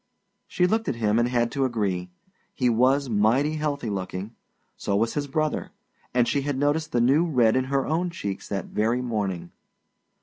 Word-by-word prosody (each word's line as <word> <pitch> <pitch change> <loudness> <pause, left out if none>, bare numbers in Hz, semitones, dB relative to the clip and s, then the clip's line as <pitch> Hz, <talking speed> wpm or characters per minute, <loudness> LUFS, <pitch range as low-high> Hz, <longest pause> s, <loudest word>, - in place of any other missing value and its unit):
She 180 - +1
looked 220 +4 +1
at 135 - -1
him 110 -1 +1
and 120 - +3
had 120 -1 +1
to 140 -1 0
agree. 100 -8 -1 0.5
He 125 -2 +2
was 130 +4 +3
mighty 120 +8 +2
healthy 145 -6 -2
looking; 95 +2 -4 0.4
so 100 - -2
was 115 +3 +1
his 145 -1 -2
brother. 155 +2 -1 0.4
And 120 -1 +2
she 140 - +1
had 140 -1 -2
noticed 145 +3 0
the 120 - +1
new 135 +7 +4
red 120 -7 +3
in 130 0 +1
her 135 0 0
own 170 +4 0
cheeks 100 - -5
that 100 -1 -2
very 115 +4 0
morning. 100 -8 -3
125 Hz, 180 wpm, -25 LUFS, 110-145 Hz, 0.5 s, new